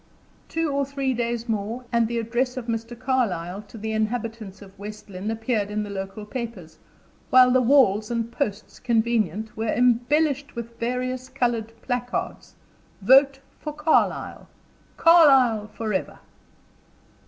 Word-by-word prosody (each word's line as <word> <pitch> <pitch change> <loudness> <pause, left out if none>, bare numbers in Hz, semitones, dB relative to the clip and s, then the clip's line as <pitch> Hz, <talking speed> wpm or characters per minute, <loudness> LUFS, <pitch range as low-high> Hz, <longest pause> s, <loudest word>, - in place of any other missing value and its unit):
Two 325 -2 -1
or 280 0 +1
three 275 -1 -2
days 235 0 -2
more, 225 +3 -3
and 235 -2 +2
the 235 +1 -3
address 240 +3 -1
of 250 - -4
Mr. 230 +1 -4
Carlyle 210 -8 -1
to 225 - -12
the 220 +1 -4
inhabitants 220 -2 -3
of 195 0 -17
West 210 0 -9
Lynne 190 +3 -5
appeared 225 -2 -1
in 210 0 -2
the 205 - -7
local 195 +2 -6
papers, 220 -8 -7 0.5
while 255 0 +7
the 255 0 +4
walls 230 -5 +4
and 230 -1 -2
posts 220 -5 -4
convenient 225 -2 0
were 225 +1 -3
embellished 280 +4 +1
with 235 0 -7
various 255 +2 -3
colored 240 -4 -1
placards, 245 -1 -4 0.5
"Vote 270 +4 +5 0.2
for 300 - -5
Carlyle." 300 +1 0 0.5
"Carlyle 270 -10 +5
forever!" 215 -3 -3
235 Hz, 135 wpm, -24 LUFS, 215-255 Hz, 0.5 s, while